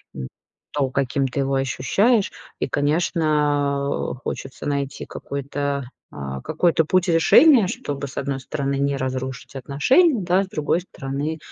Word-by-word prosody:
м, 65 -1 -5 0.4
то, 140 -3 0
каким 135 0 0
ты 130 - -4
его 135 0 0
ощущаешь. 190 - +2 0.3
И, - - 0
конечно, 145 -2 +1
э, - - -7
хочется 135 - -6
найти 140 -1 -2
какой-то 140 0 -3 0.3
а, 65 -1 -6
какой-то 160 0 +2
путь 185 +2 +2
решения, 215 - +6
чтобы, 140 -5 -4
с 135 - -12
одной 135 -1 -2
стороны, 140 0 -2
не 140 0 +1
разрушить 130 0 -4
отношения, 245 - +3
да, 185 +3 +2
с - - -7
другой 165 0 0
стороны, 145 -1 -4
140 Hz, 140 wpm, -22 LUFS, 135-160 Hz, 0.4 s, решения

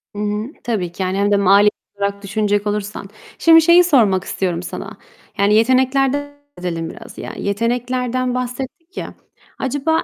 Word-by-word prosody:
Hı - - -5
hı, 210 +1 -2 0.2
tabii 200 -8 -2
ki 190 +2 -4
yani 185 +1 -1
hem 205 +1 +1
de 205 - +4
mali 200 +1 +5 0.3
olarak 200 0 -3
düşünecek 205 +1 0
olursan. 205 -1 -4 0.3
Şimdi 325 0 +7
şeyi 340 +2 +6
sormak 220 - +3
istiyorum 180 -3 -2
sana. - - -7 0.4
Yani, 200 +1 +3
yeteneklerden 260 +4 +2 0.3
söz 180 - -8
edelim 165 -2 -3
biraz - - -12
yani. - - -7
Yeteneklerden 245 +3 -1
bahsettik 260 +8 -6
ya. - - -5 0.5
Acaba 290 +5 0
215 Hz, 155 wpm, -19 LUFS, 200-260 Hz, 0.5 s, Şimdi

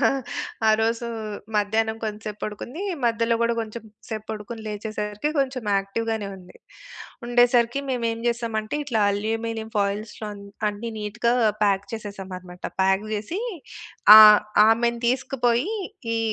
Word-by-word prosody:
మా - - +1 0.5
ఆ - - +5
రోజు 230 +1 0 0.5
మధ్యాహ్నం 220 +2 +1
కొంతసేపు 215 -1 -5
పడుకుంది. 240 - -5 0.2
మధ్యలో 230 0 +2
గూడా 235 0 +2
కొంచెం 225 0 -5 0.3
సేపు 215 -2 -5
పడుకొని, 220 +1 -6
లేచేసరికి 210 +3 -3
కొంచెం 260 -2 0
యాక్టివ్‌గానే 215 +2 -2
ఉంది. 180 -1 -15 0.7
ఉండేసరికి 240 +1 +3
మేమేం 230 -3 -1
జేసాం 235 -1 -1
అంటే, 215 +6 -4
ఇట్లా 240 -6 0
అల్యూమినియం 220 +2 -3
ఫాయిల్స్‌లో 205 +2 -2
అన్ 200 - -11 0.3
అన్నీ 210 +3 -5
నీట్‌గా 210 +3 -1 0.3
ప్యాక్ 200 -1 +2
చేసేసామన్నమాట. 190 -4 -8 0.2
ప్యాక్ 190 +2 +2
జేసి 215 - -3 0.8
ఆహ్, 215 -1 +10 0.3
ఆమెను 235 +1 +2
తీసుకుపోయి 255 - 0 0.4
ఈ - - +1
220 Hz, 120 wpm, -24 LUFS, 210-235 Hz, 0.8 s, ఆహ్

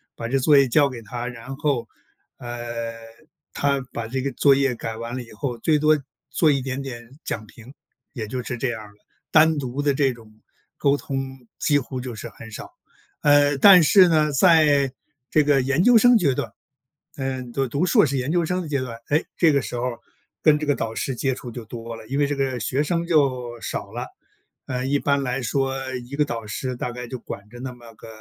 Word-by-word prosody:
把 115 - -5
这 135 +3 +1
作 145 +2 +5
业 135 -1 +5
交 140 +3 +4
给 120 -3 -8
他， 120 +3 -5
然 125 +2 -7
后， 135 -6 0 0.5
呃， 120 -1 -5 0.6
他 140 -1 +1
把 115 -1 -4
这 130 +4 -3
个 140 - -1
作 135 +2 +4
业 135 -1 +1
改 115 -1 -5
完 115 +1 -5
了 130 - -4
以 115 - -12
后， 120 +2 -4
最 155 +6 +2
多 155 +1 +4 0.4
做 160 - +3
一 140 - +1
点 135 +1 -3
点 125 0 -9
讲 110 - -4
评， 115 +4 -14 0.4
也 115 -6 -5
就 125 +4 -3
是 125 0 -5
这 125 +2 -1
样 110 -2 -4
儿。 105 -1 -12 0.4
单 155 -1 +5
独 130 0 -5
的 145 -1 +2
这 135 -1 +2
种 115 -2 -15 0.5
沟 140 0 +2
通 135 -3 -5
几 145 -2 +3
乎 130 0 -6
就 125 -1 -6
是 - - -7
很 115 - -12
少。 105 - -8 0.5
呃， 145 -1 +4
但 185 +4 +9
是 185 +4 +6
呢， 155 -2 +3
在 145 -3 +4 0.4
这 155 - +4
个 145 -2 +4
研 140 +5 +1
究 245 +1 +7
生 245 +1 +6
阶 155 -10 +2
段， - - -3 0.7
嗯， 130 -3 -4
就 135 +1 0
读 145 +8 0
硕 170 - +5
士 140 -1 -1
研 130 +2 -2
究 170 -1 +2
生 180 +3 -1
的 170 - -6
阶 140 -3 -1
段， 120 -3 -6
诶， 150 +3 +2
这 165 -3 +5
个 140 - +3
时 - - -6
候 120 - -2 0.6
跟 155 -2 +6
这 155 - -3
个 145 -1 +2
导 115 -3 -3
师 135 - -2
接 135 +3 0
触 125 -1 -8
就 120 0 -7
多 115 +1 -7
了。 110 - -12
因 135 +4 -2
为 145 - +4
这 145 - -2
个 135 -2 -1
学 130 +5 0
生 170 +1 -1
就 130 -7 +1
少 - - -5
了， - - -5 0.6
呃， 125 0 -2
一 140 +1 +2
般 140 0 +1
来 125 0 -2
说 135 +4 -1 0.3
一 140 - -7
个 150 +1 +2
导 115 -5 -5
师 125 +4 -4
大 120 0 -4
概 125 0 -7
就 130 0 -6
管 100 -2 -8
着 120 +2 -12
那 130 0 -5
么 120 -2 -15
个， 110 - -13
135 Hz, 240 characters per minute, -23 LUFS, 120-145 Hz, 0.7 s, 但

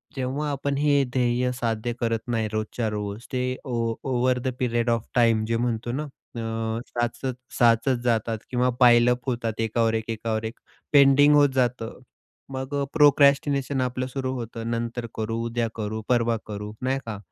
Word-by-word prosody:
जेव्हा 135 +3 -2
आपण 140 0 -2
हे 145 -1 +3
ध्येय 125 0 +1
साध्य 115 0 -1
करत 115 -1 0
नाही 115 -2 0
रोजच्या 110 +1 -2
रोज, 105 +1 -5
ते 125 0 -1
ओ 125 -3 -3 0.3
"over 125 0 +2
the 125 - -4
period 120 -1 0
of 115 -1 0
time" 115 -2 +4
जे 115 0 +1
म्हणतो 120 0 -1
ना 140 +5 -2 0.3
अ, 115 0 -2
साचत 120 +2 -2 0.3
साचत 120 +2 +4
जातात 115 -2 +1
किंवा 125 0 +1
पायलअप 125 0 +5
होतात 115 -2 -2
एकावर 115 0 +1
एक 110 0 -2
एकावर 110 0 -2
एक 110 +3 -6 0.3
पेंडिंग 145 +1 +7
होत 145 -1 +6
जातं. 125 -2 -1 0.5
मग 130 +1 -5 0.2
प्रोक्रॅस्टिनेशन 140 -2 +4
आपलं 125 0 -2
सुरु 130 0 -3
होतं, 115 -2 -5
नंतर 115 +1 -3
करू, 110 +1 -2
उद्या 115 0 -1
करू, 110 0 -3
परवा 120 -2 +2
करू, 105 0 -5
नाही 130 +1 0
का. 110 -2 -5
120 Hz, 160 wpm, -25 LUFS, 115-130 Hz, 0.5 s, पेंडिंग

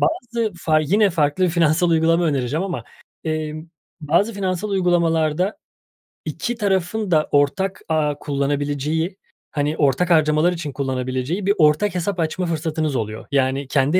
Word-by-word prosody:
bazı 235 - -1
fa 155 -2 +2
yine 200 +7 +3
farklı 165 +2 +1
finansal 170 +1 +2
uygulama 165 +1 +3
önereceğim 145 +2 0
ama, 185 -3 -4 0.4
emm, 155 0 -3 0.3
bazı 170 +9 +1
finansal 190 +1 -2
uygulamalarda 175 -1 +1 0.7
2 240 - -3
tarafın 200 -1 -1
da 155 -2 +3
ortak 150 +7 +1
ağı 150 -2 0
kullanabileceği, 145 +4 -1 0.3
hani, 150 +1 -1
ortak 145 +5 +2
harcamalar 155 +1 +3
için 160 -4 -5
kullanabileceği 130 +6 -2
bir 200 - +4
ortak 155 +6 +3
hesap 180 +1 -2
açma 165 +3 -1
fırsatınız 160 -3 -2
oluyor. 110 -2 -4
Yani, 135 0 +1
kendi 140 +6 +2
160 Hz, 135 wpm, -21 LUFS, 145-185 Hz, 0.7 s, bir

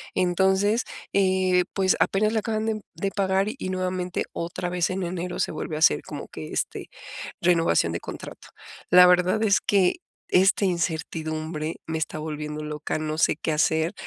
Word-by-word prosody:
Entonces, 190 +5 +2 0.3
eh, 185 -2 +3
pues, 190 -1 +2
apenas 215 +2 +2
le 220 - +2
acaban 220 0 -2
de 215 -1 -2
de 195 0 -2
pagar, 195 0 +1
y 185 - -4
nuevamente 185 -1 -2
otra 175 +1 -4
vez 180 -1 0
en 190 0 -2
enero 180 0 -4
se - - 0
vuelve 155 0 -5
a - - -4
hacer 155 - +4
como - - -7
que, 80 -1 -8
este, - - -3 0.5
renovación 165 - +3
de 85 - -2
contrato. - - -9 0.4
La 180 0 +9
verdad 180 +4 +3
es 205 -2 +4
que 195 - +2 0.3
esta 195 +2 +4
incertidumbre 160 -2 -2
me 160 0 -2
está 155 - -3
volviendo 150 0 -5
loca, 150 0 -3
no 155 0 -3
sé - - +3
qué 160 - -2
hacer, 160 +4 +1
180 Hz, 165 wpm, -25 LUFS, 160-190 Hz, 0.5 s, La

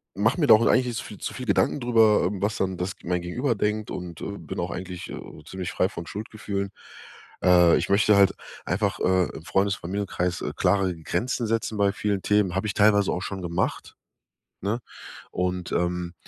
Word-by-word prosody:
mach - - +2
mir - - +2
da - - +9
auch 115 - +2
eigentlich 125 - +4
nicht 120 -1 -3
zu - - -6
viel 105 - -9
zu - - -4
viel 125 - -6
Gedanken 100 +7 +2
drüber, 115 -5 +4
ähm, 100 -1 -4
was 105 +1 0
dann 95 -2 -1
das 90 +2 -3
g - - -14
mein 90 0 0
Gegenüber 120 +8 -1
denkt 105 +1 -1
und, 90 -3 -7
äh, 100 0 -5
bin 80 - -7
auch - - -2
eigentlich, 90 -1 -6
äh, - - -6 0.3
ziemlich 95 -2 -5
frei 95 - +1
von 85 -4 -7
Schuldgefühlen. 100 -2 -4 0.7
Äh, 90 -2 +6
ich - - -2
möchte 100 +1 +4
halt 100 -1 +5 0.3
einfach, 100 +1 0
äh, 95 -1 +2
im 80 - -8
Freundes, 95 +3 +1
Familienkreis, 90 -1 -3
äh, - - -3
klare 95 -3 +2
Grenzen 115 +8 -2
setzen 115 -1 -1
bei 100 -1 +4
vielen 100 -1 -1
Themen. 105 -3 +2
Hab 95 +3 -1
ich 105 - -1
teilweise 105 -1 +4
auch 90 - -3
schon 95 -1 -5
gemacht, 85 +1 -2 0.7
ne? 105 +5 -1 0.5
Und, 90 -1 -2
ähm, 90 0 -1
100 Hz, 205 wpm, -25 LUFS, 90-105 Hz, 0.7 s, da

